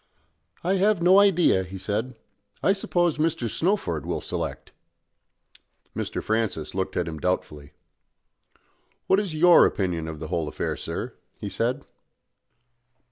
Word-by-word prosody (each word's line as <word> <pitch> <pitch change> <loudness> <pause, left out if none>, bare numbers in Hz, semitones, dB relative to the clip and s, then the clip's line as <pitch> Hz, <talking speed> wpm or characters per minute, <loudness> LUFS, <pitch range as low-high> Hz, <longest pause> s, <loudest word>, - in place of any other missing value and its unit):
"I 190 +3 +1
have 205 0 +3
no 180 +3 +6
idea," 180 - +4
he 95 +1 -8
said. 110 +6 -3 0.5
"I 195 - +4
suppose 175 -5 0
Mr. 160 -6 0
Snowford 160 - -1
will - - -2
select." - - -5 1.2
Mr. - - -3
Francis 110 -8 -1
looked 95 0 -3
at 90 - 0
him 80 -2 -5
doubtfully. 75 -5 -3 1.3
"What 190 - +3
is 195 -6 -3
your 175 +2 +7
opinion 85 -5 0
of 80 -1 -6
the 80 +1 -7
whole 85 -3 -1
affair, - - -3
sir?" - - -5 0.2
he 100 - -5
said. 125 +7 -1
115 Hz, 135 wpm, -25 LUFS, -, 1.3 s, your